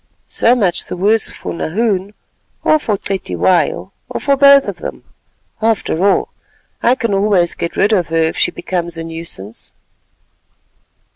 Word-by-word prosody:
So 240 Hz, +2 st, +3 dB
much 190 Hz, -7 st, 0 dB
the -, -, -6 dB
worse 210 Hz, +4 st, +2 dB
for -, -, -7 dB
Nahoon, 200 Hz, +3 st, -1 dB, 0.5 s
or 310 Hz, -, +4 dB
for 215 Hz, -8 st, -1 dB
Cetywayo, 190 Hz, -2 st, 0 dB, 0.2 s
or -, -, -4 dB
for 280 Hz, -1 st, +2 dB
both 280 Hz, 0 st, +6 dB
of -, -, -5 dB
them. -, -, -7 dB, 0.6 s
After 215 Hz, -6 st, 0 dB
all, 200 Hz, -, +2 dB, 0.5 s
I 245 Hz, -, +3 dB
can 230 Hz, -5 st, -2 dB
always 195 Hz, -3 st, +2 dB
get 170 Hz, -, -4 dB
rid 205 Hz, +3 st, +3 dB
of 180 Hz, -5 st, +1 dB
her 165 Hz, -, -4 dB
if 160 Hz, 0 st, +1 dB
she -, -, +2 dB
becomes 170 Hz, -2 st, -4 dB
a 165 Hz, -, -4 dB
nuisance." 165 Hz, -, -8 dB
195 Hz, 150 wpm, -16 LUFS, 170-225 Hz, 0.6 s, both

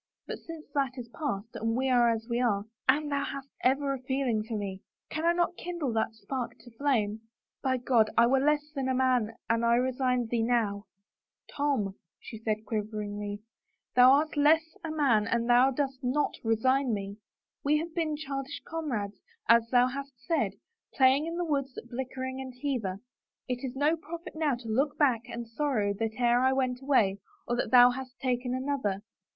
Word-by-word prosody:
But -, -, -6 dB
since 330 Hz, -2 st, -9 dB
that 275 Hz, -2 st, 0 dB
is 240 Hz, -2 st, -7 dB
past 230 Hz, -7 st, -4 dB
and 225 Hz, +1 st, -1 dB
we 265 Hz, +1 st, +1 dB
are 245 Hz, -2 st, +4 dB
as 225 Hz, -1 st, -1 dB
we 240 Hz, 0 st, 0 dB
are 205 Hz, -5 st, +1 dB
— -, -, -14 dB
Anne, 295 Hz, +2 st, +3 dB
thou 280 Hz, -1 st, 0 dB
hast 275 Hz, 0 st, -6 dB
ever 275 Hz, +2 st, +2 dB
a 265 Hz, -, -5 dB
feeling 260 Hz, -4 st, 0 dB
for 220 Hz, 0 st, -4 dB
me. 195 Hz, -2 st, -5 dB, 0.3 s
Can 315 Hz, +2 st, -2 dB
I -, -, +6 dB
not 345 Hz, 0 st, +1 dB
kindle 340 Hz, -8 st, -3 dB
that 225 Hz, 0 st, 0 dB
spark 245 Hz, +1 st, -5 dB
to 240 Hz, -, -15 dB
flame? 225 Hz, -4 st, 0 dB, 0.4 s
By 260 Hz, -1 st, +1 dB
God, 240 Hz, -3 st, +3 dB
I 235 Hz, -, +7 dB
were 265 Hz, +3 st, +3 dB
less 295 Hz, +1 st, +1 dB
than 270 Hz, -3 st, -2 dB
a 260 Hz, -, +1 dB
man 250 Hz, -4 st, +2 dB
an 230 Hz, 0 st, +1 dB
I 235 Hz, 0 st, +4 dB
resigned 250 Hz, -1 st, +1 dB
thee 235 Hz, -1 st, +1 dB
now! 225 Hz, -3 st, 0 dB, 0.6 s
t" -, -, -16 dB
Tom," 275 Hz, -9 st, 0 dB, 0.3 s
she 220 Hz, -, -9 dB
said 215 Hz, -1 st, -2 dB
quiveringly, 210 Hz, -1 st, -4 dB, 0.2 s
" -, -, -50 dB
thou 250 Hz, +1 st, +8 dB
art 305 Hz, +3 st, +2 dB
less 315 Hz, +2 st, +3 dB
than 325 Hz, -, -4 dB
a -, -, -5 dB
man 235 Hz, -9 st, +3 dB
an 235 Hz, 0 st, +1 dB
thou 245 Hz, +2 st, +5 dB
dost 270 Hz, 0 st, -2 dB
not 265 Hz, +4 st, +1 dB
resign 245 Hz, +2 st, +2 dB
me. 200 Hz, 0 st, -6 dB, 0.5 s
We 295 Hz, +2 st, +3 dB
have 325 Hz, +2 st, -4 dB
been 320 Hz, -3 st, -1 dB
childish 275 Hz, -1 st, -5 dB
comrades, 240 Hz, -12 st, -3 dB, 0.3 s
as 230 Hz, +1 st, +5 dB
thou 245 Hz, 0 st, +5 dB
hast 275 Hz, +2 st, -5 dB
said, 330 Hz, -, +1 dB, 0.4 s
playing 270 Hz, +3 st, +4 dB
in 335 Hz, +1 st, -4 dB
the 350 Hz, -, -1 dB
woods 275 Hz, -4 st, -2 dB
at 240 Hz, -, -9 dB
Blickling 260 Hz, +1 st, -4 dB
and 260 Hz, -1 st, -8 dB
Hever. 220 Hz, -10 st, -2 dB, 0.5 s
It 250 Hz, 0 st, -3 dB
is 260 Hz, -1 st, -4 dB
no 295 Hz, +4 st, +3 dB
profit 335 Hz, +1 st, -8 dB
now 310 Hz, -4 st, +1 dB
to 240 Hz, -1 st, -10 dB
look 270 Hz, +7 st, 0 dB
back 250 Hz, -6 st, +2 dB
and 235 Hz, 0 st, -5 dB
sorrow 230 Hz, -5 st, 0 dB
that 225 Hz, -1 st, -1 dB
e'er 240 Hz, 0 st, +4 dB
I 260 Hz, +1 st, +3 dB
went 255 Hz, -1 st, 0 dB
away 225 Hz, -8 st, +2 dB, 0.3 s
or 240 Hz, -, 0 dB
that -, -, -1 dB
thou 245 Hz, -1 st, +8 dB
hast 260 Hz, 0 st, -7 dB
taken 250 Hz, -1 st, -1 dB
another. 255 Hz, -7 st, -2 dB
255 Hz, 200 wpm, -29 LUFS, 230-280 Hz, 0.6 s, thou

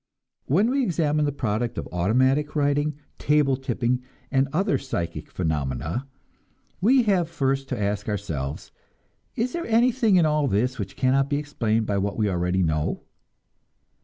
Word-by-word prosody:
When 200 Hz, -, +3 dB
we 275 Hz, +1 st, +2 dB
examine 155 Hz, -, +1 dB
the 145 Hz, -, 0 dB
product 120 Hz, -3 st, -2 dB
of -, -, -4 dB
automatic 130 Hz, -, +2 dB
writing, 145 Hz, 0 st, +1 dB, 0.2 s
table 150 Hz, -2 st, +3 dB
tipping, 125 Hz, -1 st, -1 dB, 0.3 s
and 135 Hz, 0 st, +2 dB
other 195 Hz, +6 st, +1 dB
psychic 85 Hz, -, -4 dB
phenomena, 80 Hz, -, -2 dB, 0.7 s
we 250 Hz, +6 st, +5 dB
have 190 Hz, -7 st, +2 dB
first 135 Hz, 0 st, -1 dB
to 125 Hz, -, -3 dB
ask 100 Hz, +1 st, -1 dB
ourselves, 80 Hz, -10 st, -4 dB, 0.6 s
Is 245 Hz, +2 st, -1 dB
there 340 Hz, 0 st, -3 dB
anything 230 Hz, -2 st, +3 dB
in 175 Hz, -3 st, +5 dB
all 150 Hz, -2 st, +2 dB
this 125 Hz, +4 st, 0 dB
which 95 Hz, -2 st, -5 dB
cannot 135 Hz, +1 st, +2 dB
be 145 Hz, -, +1 dB
explained 115 Hz, -7 st, -1 dB
by 100 Hz, -2 st, 0 dB
what 100 Hz, +1 st, -2 dB
we 105 Hz, -2 st, +1 dB
already 90 Hz, 0 st, 0 dB
know? 75 Hz, -2 st, -1 dB
135 Hz, 150 wpm, -25 LUFS, 100-150 Hz, 0.7 s, we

